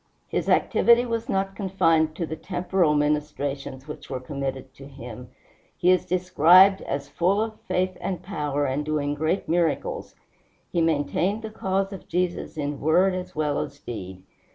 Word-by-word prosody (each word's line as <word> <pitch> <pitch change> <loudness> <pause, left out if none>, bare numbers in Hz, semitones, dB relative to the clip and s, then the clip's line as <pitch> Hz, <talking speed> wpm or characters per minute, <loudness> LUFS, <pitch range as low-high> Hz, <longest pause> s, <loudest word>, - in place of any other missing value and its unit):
His - - -1
activity 235 +1 +4
was 230 +1 -3
not 195 -2 -1
confined 165 -5 +2
to 170 - -2
the 160 - -5
temporal 175 -2 0
ministrations 145 -2 -2
which 150 - -9
were 130 - -3
committed 135 -1 -5
to 135 0 -12
him. 125 -3 -10 0.5
He 180 - +4
is 185 - +2
described 185 +2 +5
as 140 0 -4
"full 185 +4 +1
of 220 0 -3
faith 185 0 0
and 185 -4 -3
power, 150 -6 -2
and 135 +2 -1
doing 150 -1 -1
great 155 +5 -1
miracles." 165 -1 -1 0.6
He 170 - +1
maintained 165 +7 0
the 220 - -5
cause 195 -1 -1
of 195 - -10
Jesus 180 -2 -2
in 145 -1 -3
word 180 +5 +3
as 185 0 -5
well 150 -2 0
as 140 0 -5
deed. 95 -8 -8
160 Hz, 160 wpm, -25 LUFS, 145-185 Hz, 0.6 s, described